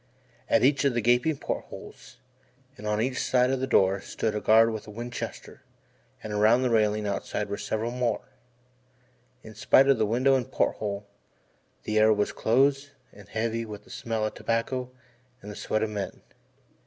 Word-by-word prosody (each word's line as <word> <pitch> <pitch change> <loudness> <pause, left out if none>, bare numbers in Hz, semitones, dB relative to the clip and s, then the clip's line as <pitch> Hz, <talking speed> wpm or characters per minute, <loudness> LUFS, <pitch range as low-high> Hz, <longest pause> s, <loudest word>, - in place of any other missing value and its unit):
At - - +3
each 140 +2 +3
of 140 -4 +1
the 120 - +1
gaping 120 +6 +2
port - - -4
holes, - - -12 0.6
and 105 -6 -8
on 105 0 0
each 125 +3 -1
side 125 0 +2
of 135 - 0
the 130 - -2
door, 95 -5 +3
stood 110 +2 -3
a 105 - -3
guard 115 +1 +5
with 110 -1 -7
a - - -9
Winchester, 120 +3 -7 0.6
and 110 - -5
around 110 +5 +4
the 125 - +1
railing 105 -1 +2
outside 100 +1 -3
were 100 - -3
several 110 +2 -2
more. 125 -1 -1 1.2
In 110 - -11
spite 130 +5 +4
of 135 -4 +4
window 120 +5 +2
and 130 -3 0
port - - 0
hole 100 -1 -4 0.8
the 110 0 0
air 110 0 +5
was 105 -1 +1
close 135 +4 +2 0.2
and 100 0 -15
heavy 115 +1 -2
with 105 -2 -9
the - - -17
smell 110 -2 -2
of 110 - -3
tobacco 125 +2 -2 0.5
and 105 - -9
the - - -9
sweat 110 +1 -1
of 110 - -2
men. 100 -2 -5
110 Hz, 180 wpm, -27 LUFS, 105-125 Hz, 1.2 s, guard